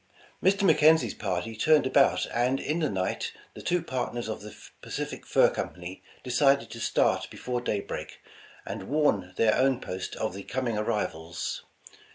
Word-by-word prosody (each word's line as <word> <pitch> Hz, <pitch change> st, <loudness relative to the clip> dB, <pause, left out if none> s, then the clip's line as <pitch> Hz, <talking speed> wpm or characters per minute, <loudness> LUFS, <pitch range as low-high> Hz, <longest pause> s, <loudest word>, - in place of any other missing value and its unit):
Mr. 200 Hz, +2 st, +3 dB
McKenzie 155 Hz, -, +5 dB
's -, -, -8 dB
party 95 Hz, +2 st, -3 dB
turned 155 Hz, +7 st, +4 dB
about, 135 Hz, +1 st, +4 dB
and 125 Hz, +3 st, +1 dB
in 155 Hz, +3 st, -1 dB
the 155 Hz, -3 st, +1 dB
night, 95 Hz, -1 st, -2 dB, 0.2 s
the -, -, -9 dB
two 175 Hz, -1 st, 0 dB
partners 125 Hz, -5 st, -3 dB
of 110 Hz, -, -4 dB
the 105 Hz, 0 st, -10 dB, 0.3 s
Pacific -, -, -5 dB
Fur -, -, +5 dB
Company 90 Hz, +1 st, -5 dB, 0.2 s
de 125 Hz, -, -5 dB
cided 135 Hz, -2 st, +3 dB
to 115 Hz, -, -7 dB
start -, -, +1 dB
before 125 Hz, -1 st, -3 dB
daybreak, 105 Hz, -4 st, -4 dB, 0.5 s
and -, -, -6 dB
warn 110 Hz, -12 st, +1 dB
their 110 Hz, -1 st, +4 dB
own 130 Hz, -1 st, +3 dB
post 90 Hz, -5 st, -5 dB
of 110 Hz, -4 st, -2 dB
the 100 Hz, -, -6 dB
coming 125 Hz, +2 st, -2 dB
arrivals. 90 Hz, -6 st, -2 dB
120 Hz, 165 wpm, -28 LUFS, 100-140 Hz, 0.5 s, McKenzie